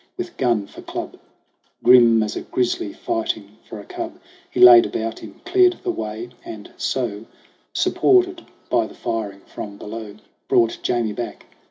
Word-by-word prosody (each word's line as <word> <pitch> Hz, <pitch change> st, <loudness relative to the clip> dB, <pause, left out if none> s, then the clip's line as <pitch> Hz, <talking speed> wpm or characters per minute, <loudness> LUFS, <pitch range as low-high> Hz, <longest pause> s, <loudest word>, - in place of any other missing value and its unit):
With 360 Hz, -1 st, -5 dB
gun 115 Hz, -5 st, +1 dB
for -, -, -12 dB
club, -, -, -6 dB, 0.6 s
Grim 120 Hz, -2 st, +7 dB
as 105 Hz, -, -4 dB
a -, -, -3 dB
grizzly 120 Hz, -4 st, -1 dB
fighting 110 Hz, -1 st, -3 dB
for 110 Hz, -, -7 dB
a 100 Hz, -, -11 dB
cub, -, -, -6 dB, 0.3 s
He -, -, -5 dB
laid 120 Hz, -1 st, +10 dB
about 115 Hz, 0 st, -4 dB
him, -, -, -12 dB
cleared 365 Hz, -1 st, +4 dB
the 370 Hz, -, 0 dB
way, 110 Hz, -, -5 dB
and 105 Hz, -2 st, -9 dB
so, 115 Hz, -4 st, -3 dB, 0.5 s
Supported 365 Hz, -2 st, +2 dB, 0.2 s
by 115 Hz, -3 st, +1 dB
the -, -, -14 dB
firing 105 Hz, -3 st, -4 dB
from 100 Hz, 0 st, -8 dB
below, 105 Hz, 0 st, -8 dB, 0.3 s
Brought 115 Hz, -1 st, +2 dB
Jamie 115 Hz, -3 st, 0 dB
back. 120 Hz, +1 st, -6 dB
115 Hz, 155 wpm, -21 LUFS, 105-125 Hz, 0.6 s, laid